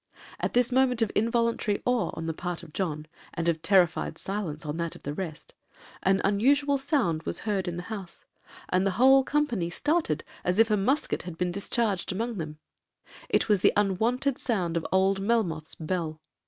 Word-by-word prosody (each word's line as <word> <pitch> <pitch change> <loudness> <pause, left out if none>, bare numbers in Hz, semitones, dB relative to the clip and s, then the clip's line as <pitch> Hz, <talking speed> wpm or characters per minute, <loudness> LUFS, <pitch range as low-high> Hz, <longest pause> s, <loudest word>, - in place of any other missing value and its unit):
At - - -2
this 245 0 +3
moment 250 -2 +3
of 215 - -1
involuntary 230 -2 +1
awe 245 -2 +1
on 160 - -5
the 160 - -2
part 175 +1 -5
of 160 -3 -13
John, 155 -5 -2 0.3
and 170 -1 -2
of 165 -2 +1
terrified 175 -2 +2
silence 180 -6 -4
on 150 +1 -3
that 170 -1 -3
of - - -14
the 145 - -3
rest, 160 -2 -6 0.5
an 195 0 +2
unusual 280 +8 +3
sound 265 - +1
was - - -5
heard 200 -4 -1
in 175 -1 -3
the 175 - -5
house, 195 -3 -8 0.4
and 185 +1 +2
the 195 -1 0
whole 265 +2 +7
company 260 - 0
started 295 - 0 0.2
as 180 +1 0
if 225 0 +4
a - - +5
musket 260 +10 0
had 175 -2 -8
been 180 0 0
discharged 200 0 -1
among 225 +2 -3
them:—it 155 -1 -5
was 210 -3 +3
the - - +4
unwonted 230 +7 +1
sound 185 -9 -1
of 165 - -1
old 190 +1 +3
Melmoth's 195 -8 0
bell. 160 -1 -3
195 Hz, 180 wpm, -27 LUFS, 170-235 Hz, 0.5 s, whole